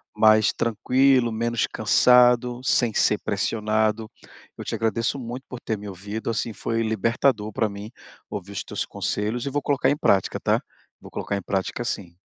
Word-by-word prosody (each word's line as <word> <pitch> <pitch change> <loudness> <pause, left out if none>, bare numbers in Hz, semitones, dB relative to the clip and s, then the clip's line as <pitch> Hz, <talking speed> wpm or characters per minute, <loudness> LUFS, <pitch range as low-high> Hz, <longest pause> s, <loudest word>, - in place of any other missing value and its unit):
mais 110 -1 +5
tranquilo, 125 +2 +2
menos 115 +1 -1
cansado, 125 0 +4
sem 120 -4 +2
ser 105 - +3
pressionado. 110 +1 0 0.5
Eu - - -6
te - - -5
agradeço 115 +4 -1
muito 125 +2 -6
por 125 - -7
ter 110 - -3
me 105 0 -9
ouvido, 100 +5 -6
assim, 115 0 -2
foi 115 +2 -2
libertador 110 +1 0
pra 110 +1 0
mim 100 +1 -8 0.4
ouvir 100 0 -6
os - - -4
teus - - -4
conselhos 110 +5 -3
e - - -1
vou 145 +1 -1
colocar 140 -1 +1
em 145 - +1
prática, 95 -8 +1
tá. - - +1 0.4
Vou - - -13
colocar 100 - -3
em 100 - -3
prática, 95 +5 -2
sim. 90 -7 -5
110 Hz, 170 wpm, -24 LUFS, 105-120 Hz, 0.5 s, mais